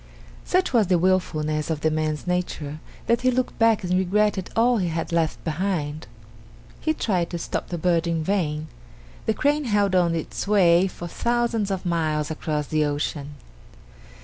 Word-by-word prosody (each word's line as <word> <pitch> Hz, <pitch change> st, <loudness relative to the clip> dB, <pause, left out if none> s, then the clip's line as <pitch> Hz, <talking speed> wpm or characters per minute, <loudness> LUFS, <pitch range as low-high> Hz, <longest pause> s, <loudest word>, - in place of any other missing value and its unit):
Such 365 Hz, -5 st, +1 dB
was 225 Hz, -5 st, +4 dB
the 180 Hz, -1 st, +3 dB
wilfulness 155 Hz, -4 st, 0 dB
of 155 Hz, -2 st, -2 dB
the 155 Hz, -, +2 dB
man's 155 Hz, -1 st, -1 dB
nature 175 Hz, -4 st, -2 dB, 0.3 s
that 235 Hz, +1 st, +2 dB
he 255 Hz, -, +3 dB
looked 255 Hz, 0 st, -1 dB
back 225 Hz, -2 st, +4 dB
and 180 Hz, 0 st, -1 dB
regretted 190 Hz, +1 st, +1 dB
all 235 Hz, +2 st, +4 dB
he 185 Hz, -4 st, 0 dB
had 165 Hz, 0 st, -3 dB
left 165 Hz, -2 st, 0 dB
behind. 160 Hz, -3 st, -2 dB, 0.7 s
He 315 Hz, -, 0 dB
tried 180 Hz, -, 0 dB
to 175 Hz, -, -3 dB
stop 170 Hz, -, -3 dB
the 175 Hz, -, -4 dB
bird 170 Hz, 0 st, +1 dB
in 165 Hz, -1 st, 0 dB
vain. 155 Hz, -5 st, -1 dB, 0.6 s
The 220 Hz, -, +2 dB
crane 295 Hz, 0 st, +1 dB
held 205 Hz, -4 st, +2 dB
on 175 Hz, -2 st, +3 dB
its 165 Hz, +4 st, -4 dB
way 185 Hz, -3 st, +5 dB
for 175 Hz, -2 st, -7 dB
thousands 235 Hz, 0 st, 0 dB
of 190 Hz, -1 st, -3 dB
miles 155 Hz, -3 st, 0 dB
across 150 Hz, -1 st, -2 dB
the 155 Hz, +1 st, +1 dB
ocean. 145 Hz, 0 st, -3 dB
175 Hz, 170 wpm, -24 LUFS, 155-205 Hz, 0.7 s, way